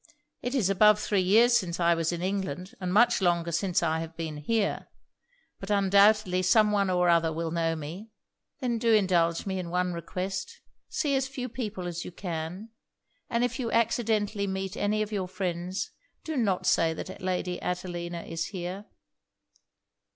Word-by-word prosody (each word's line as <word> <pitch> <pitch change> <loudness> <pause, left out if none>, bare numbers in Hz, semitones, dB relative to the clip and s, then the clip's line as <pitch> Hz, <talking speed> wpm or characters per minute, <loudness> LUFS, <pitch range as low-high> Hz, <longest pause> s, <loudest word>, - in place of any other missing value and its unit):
It 245 +3 -3
is 230 -9 +2
above 210 +2 +5
three 205 -2 +1
years 225 +6 +5
since 180 -7 0
I 170 0 +4
was 165 0 0
in 175 0 -4
England, 185 0 -3
and 180 -2 -3
much 235 +3 +4
longer 170 -2 +1
since 180 +1 0
I 160 -1 +1
have 165 0 -7
been 160 -2 -4
here. 200 +7 -1 0.7
But 195 - -8
undoubtedly 200 -1 +4
some 210 +3 +4
one 200 -2 +2
or 180 -1 +2
other 170 -1 +3
will 165 0 -3
know 165 -1 0
me.' 165 +8 -7 0.5
'Then 240 -3 0
do 230 -1 +4
indulge 175 -5 +2
me 190 -1 -2
in 175 -2 -5
one 180 +1 0
request. 185 +3 -4 0.3
See 290 -3 0
as 265 0 +1
few 265 -2 -5
people 220 -6 -5
as 175 -1 -4
you - - -8
can; 175 +3 -5 0.6
and 235 +1 +1
if 245 +2 -1
you 235 -3 -2
accidentally 215 -3 +1
meet 190 0 -3
any 215 +1 0
of 215 - -7
your 195 -3 -2
friends, 180 0 -3 0.3
do 315 - -4
not 205 -8 0
say 165 -1 +3
that 190 - -7
Lady 180 -1 -2
Adelina 175 -1 -4
is 165 0 -3
here.' 185 +1 -5
185 Hz, 175 wpm, -28 LUFS, 170-210 Hz, 0.7 s, above